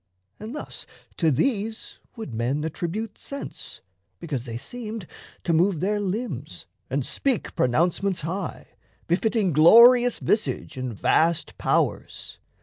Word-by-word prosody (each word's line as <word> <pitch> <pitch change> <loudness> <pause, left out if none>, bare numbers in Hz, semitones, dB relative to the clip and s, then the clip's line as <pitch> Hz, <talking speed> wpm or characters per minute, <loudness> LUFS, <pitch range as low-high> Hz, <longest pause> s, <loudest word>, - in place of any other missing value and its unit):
And, 220 +6 -7
thus, - - -7 0.3
to 165 - +3
these 220 - -1 0.2
Would 220 - -7
men 125 +6 -1
attribute 180 +7 -4
sense, 280 0 -8 0.4
because 140 -7 -4
they 115 -2 -5
seemed 220 - -6 0.4
To 170 - +1
move 175 +1 +3
their 205 +4 0
limbs 205 +5 -4 0.2
and - - -1
speak 265 -6 -1
pronouncements 170 +8 +1
high, 170 +3 -5 0.4
Befitting 200 +1 +1
glorious 240 - +7
visage 215 - -1
and 130 -1 -4
vast 160 +9 +1
powers. - - -1
190 Hz, 120 wpm, -25 LUFS, 155-225 Hz, 0.4 s, glorious